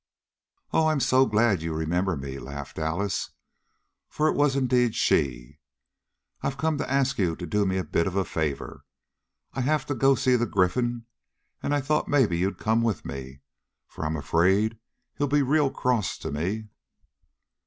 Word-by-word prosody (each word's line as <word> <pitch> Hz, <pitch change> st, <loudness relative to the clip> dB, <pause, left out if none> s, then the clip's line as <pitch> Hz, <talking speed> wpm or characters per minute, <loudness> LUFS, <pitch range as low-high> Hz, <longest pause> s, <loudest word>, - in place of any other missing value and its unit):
"Oh, 160 Hz, -, +4 dB
I'm 155 Hz, -2 st, +2 dB
so 130 Hz, 0 st, +4 dB
glad 105 Hz, -4 st, +2 dB
you 80 Hz, -1 st, -3 dB
remember 85 Hz, +3 st, 0 dB
me!" 70 Hz, 0 st, -6 dB
laughed 70 Hz, +2 st, -7 dB
Alice, 85 Hz, +5 st, -1 dB, 0.8 s
for 155 Hz, -, +1 dB
it -, -, +1 dB
was 145 Hz, -2 st, +2 dB
indeed 125 Hz, -3 st, +2 dB
she. 65 Hz, +2 st, 0 dB, 0.8 s
"I've 135 Hz, -, -2 dB
come 155 Hz, 0 st, 0 dB
to -, -, -3 dB
ask 135 Hz, -1 st, +1 dB
you 85 Hz, -4 st, +1 dB
to 90 Hz, -, -6 dB
do 100 Hz, +4 st, +1 dB
me 95 Hz, 0 st, 0 dB
a 95 Hz, -, 0 dB
bit 85 Hz, -, 0 dB
of 95 Hz, -, -3 dB
a 95 Hz, -1 st, +1 dB
favor. 75 Hz, -4 st, -3 dB, 0.7 s
I 135 Hz, -, -2 dB
have 150 Hz, +2 st, +1 dB
to 145 Hz, -, -2 dB
go 135 Hz, 0 st, +4 dB
see 130 Hz, 0 st, +2 dB
the 120 Hz, -1 st, +1 dB
Gryphon, 120 Hz, +5 st, 0 dB, 0.6 s
and -, -, -2 dB
I 145 Hz, 0 st, +2 dB
thought 150 Hz, +3 st, 0 dB
maybe 130 Hz, -11 st, +3 dB
you'd 95 Hz, +3 st, -1 dB
come 110 Hz, +1 st, +1 dB
with 115 Hz, -6 st, -1 dB
me, 65 Hz, 0 st, -7 dB, 0.4 s
for -, -, -8 dB
I'm 80 Hz, +1 st, -1 dB
afraid 95 Hz, +9 st, +2 dB, 0.4 s
he'll 145 Hz, -, +2 dB
be 145 Hz, +1 st, +3 dB
real 145 Hz, +1 st, +3 dB
cross 125 Hz, -8 st, 0 dB
to -, -, -6 dB
me." 95 Hz, +9 st, -3 dB
105 Hz, 175 wpm, -26 LUFS, 80-135 Hz, 0.8 s, Oh